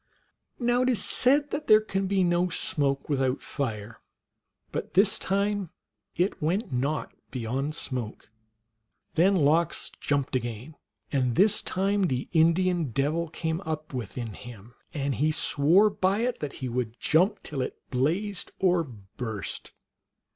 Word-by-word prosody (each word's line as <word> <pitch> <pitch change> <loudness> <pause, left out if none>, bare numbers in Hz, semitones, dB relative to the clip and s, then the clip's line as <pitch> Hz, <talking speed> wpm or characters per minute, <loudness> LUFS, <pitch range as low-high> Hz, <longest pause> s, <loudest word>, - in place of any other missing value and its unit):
Now 245 0 +2
it 255 - +2
is 230 -6 +2
said 285 +3 +3
that 295 +1 -3
there 215 - +8
can 195 -3 -2
be 195 -1 +2
no 175 +1 +2
smoke 140 -4 -1
without 135 -2 0
fire, 115 -5 -5 0.7
but - - -5
this 195 +2 +4
time 200 -1 0 0.5
it 180 +4 0
went 170 - -1
not 140 +5 -1 0.2
beyond 130 +5 -2
smoke. 120 -7 -4 0.8
Then 185 +4 +4
Lox 160 0 +2
jumped 140 -2 -1
again, 120 +4 -4 0.4
and 125 -4 +1
this 210 +2 +4
time 200 +2 0
the 130 -4 -2
Indian 170 +1 +3
Devil 145 +6 -1
came 160 +1 -3
up 155 -3 -5
within 115 -1 -5
him, 120 -1 -11 0.2
and 140 -3 -1
he 150 +5 +1
swore 165 +7 +4
by 195 +2 +1
it 245 0 -1
that 150 -2 -4
he - - -1
would 120 -1 -3
jump 180 +7 +2
till 140 -3 -4
it - - -4
blazed 175 +10 0
or 180 -2 +3
burst. 110 - -6
155 Hz, 140 wpm, -27 LUFS, 130-190 Hz, 0.8 s, there